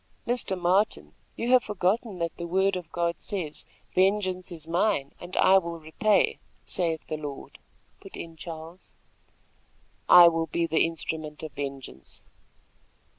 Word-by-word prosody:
"Mr. 235 -6 -1
Martin, 185 +5 +1 0.2
you 240 +2 -2
have 255 -1 +7
forgotten 210 +1 -1
that 170 -1 -3
the 170 - -5
word 190 +2 +2
of 175 -3 -6
God 170 -1 -1
says, 175 -8 -5 0.3
'Vengeance 185 -1 +1
is 160 -3 -9
mine 170 -4 0
and 175 +1 -8
I 190 0 +6
will 170 -2 -6
repay, 180 +7 +1 0.3
saith 165 -4 -2
the 155 - -4
Lord,'" 145 -2 -8 0.4
put - - -11
in 165 -1 -8
Charles. 165 +2 -10 1.2
"I 175 -1 +10
will 165 -1 +1
be 170 +2 0
the 160 -1 +2
instrument 160 -2 -5
of 155 - -6
vengeance." 135 - -8
170 Hz, 140 wpm, -27 LUFS, 160-190 Hz, 1.2 s, I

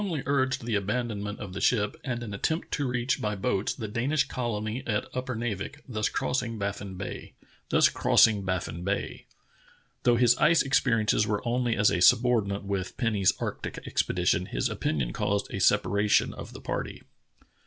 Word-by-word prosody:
}' - - -1 0.2
urged 130 -3 0
the 120 - -2
abandonment 105 0 -2
of 95 -3 -7
the 100 - -5
ship 105 -4 +2
and 120 -2 -3
an 105 -3 -6
attempt 160 +11 -2
to 145 -3 -1
reach 125 +2 -1
by 105 -1 -1
boats 95 0 0
the 110 - -5
Danish 135 +7 +1
colony 115 -2 -3
at 105 -3 0
Upernavik, 120 0 -4
thus 110 -4 -1
crossing 120 -3 -2
Baffin 100 -1 -4
Bay. 95 +2 -7 0.3
Though 100 +4 0
his 120 0 +5
ice 165 +2 +5
experiences 115 -6 +2
were 105 +3 -2
only 120 -1 +1
as 105 0 +3
a 85 - 0
subordinate 105 -2 +3
with 100 -2 -3
Penny's 105 -6 +2
arctic - - -4
expedition, 90 0 0
his - - -1
opin 75 - -1
ion - - -2
caused 100 0 -1
a 95 - -2
separation 105 +1 +3
of - - -9
the - - -10
party. - - -4
110 Hz, 155 wpm, -27 LUFS, 100-125 Hz, 0.3 s, his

